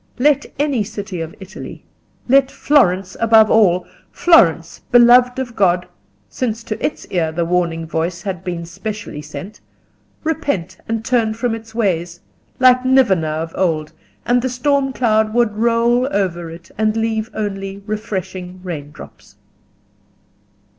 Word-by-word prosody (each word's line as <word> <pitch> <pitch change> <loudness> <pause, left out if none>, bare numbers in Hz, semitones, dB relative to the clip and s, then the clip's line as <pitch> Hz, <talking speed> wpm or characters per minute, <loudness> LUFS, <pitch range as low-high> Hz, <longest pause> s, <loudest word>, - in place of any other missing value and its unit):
Let 285 +2 +2
any 280 -6 +1
city 200 -4 -6
of 165 0 -6
Italy, 195 +2 -10 0.4
let 270 +1 +4
Florence 195 -12 +2
above 225 -1 +5
all—Florence 180 - +2
beloved 245 +1 +6
of 250 -3 -4
God, 180 -2 +2 0.4
since 230 -3 -3
to 215 - -5
its - - -2
ear 165 -4 0
the 170 +1 -1
warning 170 -2 0
voice 165 +2 -3
had 190 -3 -4
been 175 -2 -4
specially 205 -2 -6
sent—repent 195 - -6
and 225 0 -3
turn 230 -4 +1
from 235 0 -1
its 225 0 -9
ways, 175 -6 -1 0.4
like 255 0 +5
Nineveh 245 -11 +3
of 160 +2 -3
old, 160 -5 -1 0.3
and 245 0 +2
the 260 - -1
storm 270 +2 0
cloud 220 -3 +1
would 235 -3 +2
roll 235 +2 +2
over 175 -4 -1
it 170 +1 -12
and 215 0 +1
leave 225 0 -1
only 195 -1 -4
refreshing 190 -4 -5
raindrops. 150 - -9
215 Hz, 130 wpm, -18 LUFS, 175-240 Hz, 0.4 s, beloved